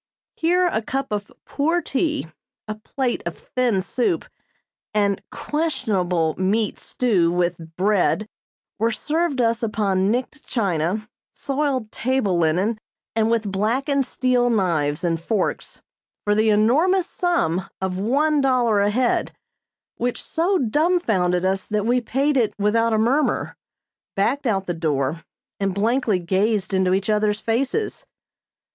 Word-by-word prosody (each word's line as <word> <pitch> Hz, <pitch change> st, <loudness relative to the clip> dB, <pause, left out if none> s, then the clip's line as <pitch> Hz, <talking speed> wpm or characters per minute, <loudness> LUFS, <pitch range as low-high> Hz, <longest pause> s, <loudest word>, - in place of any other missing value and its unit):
Here 355 Hz, +2 st, +2 dB
a 230 Hz, -11 st, 0 dB
cup 270 Hz, +3 st, -3 dB
of 205 Hz, 0 st, -3 dB
poor 325 Hz, +5 st, 0 dB
tea, 305 Hz, -, -1 dB, 0.4 s
a 215 Hz, -, -2 dB
plate 240 Hz, +4 st, -3 dB
of 170 Hz, -, -5 dB
thin 240 Hz, -7 st, 0 dB
soup 255 Hz, -, 0 dB, 0.7 s
and 200 Hz, -2 st, +2 dB
questionable 205 Hz, -, -1 dB
meat 205 Hz, +3 st, 0 dB
stew 195 Hz, -9 st, +1 dB
with 170 Hz, -2 st, -2 dB
bread 205 Hz, +2 st, +1 dB, 0.5 s
were 225 Hz, +2 st, +2 dB
served 300 Hz, +5 st, -1 dB
us 230 Hz, 0 st, +1 dB
upon 200 Hz, -4 st, +1 dB
nicked 255 Hz, +6 st, -2 dB
china, 195 Hz, -1 st, -1 dB, 0.3 s
soiled 275 Hz, -5 st, -2 dB
table 250 Hz, -6 st, 0 dB
linen 180 Hz, +7 st, +1 dB, 0.4 s
and 220 Hz, 0 st, +2 dB
with 225 Hz, -3 st, 0 dB
blackened 260 Hz, +7 st, 0 dB
steel 250 Hz, -1 st, +1 dB
knives 170 Hz, -8 st, 0 dB
and 165 Hz, -2 st, 0 dB
forks, 210 Hz, +4 st, -2 dB, 0.4 s
for 205 Hz, -, +2 dB
the 215 Hz, +1 st, +3 dB
enormous 300 Hz, -, +3 dB
sum 195 Hz, -, 0 dB
of 190 Hz, -1 st, -2 dB
one 285 Hz, +8 st, +2 dB
dollar 245 Hz, -5 st, +3 dB
a 200 Hz, +1 st, +3 dB
head; 245 Hz, +3 st, +1 dB, 0.6 s
which 245 Hz, 0 st, -1 dB
so 355 Hz, +4 st, +1 dB
dumbfounded 225 Hz, -, +1 dB
us 190 Hz, 0 st, 0 dB
that 210 Hz, -1 st, -1 dB
we 245 Hz, +2 st, +2 dB
paid 275 Hz, +4 st, +1 dB
it 230 Hz, -4 st, +1 dB
without 225 Hz, +3 st, +2 dB
a 220 Hz, -, +2 dB
murmur, 255 Hz, +7 st, +1 dB, 0.6 s
backed 265 Hz, +8 st, 0 dB
out 195 Hz, -4 st, 0 dB
the 175 Hz, -, -2 dB
door 155 Hz, -1 st, -1 dB, 0.4 s
and 195 Hz, -2 st, -1 dB
blankly 225 Hz, 0 st, +1 dB
gazed 195 Hz, +3 st, 0 dB
into 190 Hz, -1 st, +3 dB
each 195 Hz, 0 st, -2 dB
other's 210 Hz, -1 st, +1 dB
faces. 265 Hz, -, -1 dB
220 Hz, 135 wpm, -22 LUFS, 190-260 Hz, 0.7 s, the